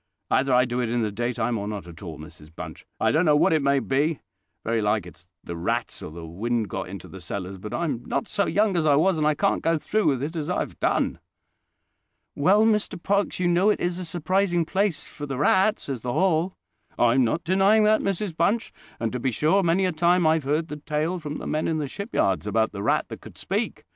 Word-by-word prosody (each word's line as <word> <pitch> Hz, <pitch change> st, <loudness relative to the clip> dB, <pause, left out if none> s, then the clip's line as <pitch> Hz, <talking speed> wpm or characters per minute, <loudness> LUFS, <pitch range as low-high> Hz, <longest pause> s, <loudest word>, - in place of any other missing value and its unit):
"Either 135 Hz, +1 st, +2 dB
I 125 Hz, 0 st, +5 dB
do 120 Hz, 0 st, -2 dB
it 120 Hz, -, -1 dB
in 120 Hz, 0 st, 0 dB
the 105 Hz, -, -1 dB
daytime 120 Hz, +1 st, -1 dB
or 100 Hz, -, -4 dB
not 105 Hz, -3 st, -5 dB
at 85 Hz, -1 st, -12 dB
all, 85 Hz, -6 st, -7 dB
Mrs 75 Hz, 0 st, -12 dB
Bunch. -, -, -9 dB
I -, -, +3 dB
don't 160 Hz, +3 st, +3 dB
know 150 Hz, -4 st, +4 dB
what 150 Hz, -, +4 dB
it 155 Hz, -, +2 dB
may 140 Hz, 0 st, +3 dB
be: 140 Hz, +3 st, 0 dB, 0.4 s
very 115 Hz, 0 st, 0 dB
like 105 Hz, -2 st, +1 dB
it's 90 Hz, 0 st, -14 dB, 0.2 s
the 85 Hz, -, -6 dB
rats, 85 Hz, +1 st, -2 dB
or -, -, -6 dB
the 85 Hz, +1 st, -8 dB
wind 110 Hz, +6 st, -2 dB
got -, -, -4 dB
into 95 Hz, -2 st, -8 dB
the 95 Hz, -, -11 dB
cellars; 95 Hz, +2 st, -5 dB
but 105 Hz, +3 st, -7 dB
I'm 145 Hz, -9 st, -2 dB
not 240 Hz, -, -2 dB
so 205 Hz, -2 st, 0 dB
young 205 Hz, -1 st, +2 dB
as 160 Hz, -2 st, +1 dB
I 145 Hz, -, +5 dB
was, 165 Hz, +3 st, +3 dB
and 150 Hz, -, +2 dB
I 155 Hz, -, +2 dB
can't -, -, +1 dB
go 165 Hz, 0 st, +2 dB
through 215 Hz, +7 st, 0 dB
with 135 Hz, -2 st, +1 dB
it 160 Hz, +4 st, -4 dB
as 155 Hz, 0 st, -3 dB
I 180 Hz, -, 0 dB
have -, -, -6 dB
done." -, -, 0 dB, 1.1 s
"Well, 195 Hz, +9 st, +4 dB
Mr 210 Hz, -4 st, +1 dB
Parkes, 200 Hz, -1 st, 0 dB
you 180 Hz, -, +1 dB
know 175 Hz, +4 st, +3 dB
it 210 Hz, -, +2 dB
is 175 Hz, 0 st, -1 dB
a -, -, -4 dB
surprising 175 Hz, +1 st, 0 dB
place 195 Hz, 0 st, -1 dB
for 145 Hz, -, -8 dB
the 135 Hz, -2 st, -4 dB
rats, 190 Hz, +8 st, +2 dB
is 135 Hz, -5 st, -4 dB
the 125 Hz, 0 st, -3 dB
Hall." 180 Hz, +1 st, +1 dB, 0.4 s
"I'm 120 Hz, +2 st, +4 dB
not 155 Hz, +9 st, 0 dB
denying 195 Hz, +5 st, +4 dB
that, 215 Hz, +1 st, +4 dB
Mrs 195 Hz, -2 st, -2 dB
Bunch; 200 Hz, +8 st, 0 dB, 0.3 s
and, 115 Hz, -1 st, -1 dB
to 125 Hz, -, -2 dB
be 130 Hz, -, 0 dB
sure, 155 Hz, -, +2 dB
many 180 Hz, +2 st, +2 dB
a 185 Hz, -, +1 dB
time 175 Hz, +2 st, +2 dB
I've 160 Hz, -2 st, +2 dB
heard 155 Hz, +4 st, 0 dB
the 150 Hz, -, -5 dB
tale 155 Hz, +4 st, -2 dB
from 150 Hz, -2 st, -5 dB
the -, -, -7 dB
men 155 Hz, +1 st, -1 dB
in 160 Hz, -, 0 dB
the 150 Hz, -2 st, -2 dB
shipyards 130 Hz, -, -1 dB
about 110 Hz, +1 st, +1 dB
the 100 Hz, -, -6 dB
rat -, -, +1 dB
that -, -, -8 dB
could -, -, -13 dB
speak. -, -, -3 dB
150 Hz, 240 wpm, -25 LUFS, 115-180 Hz, 1.1 s, I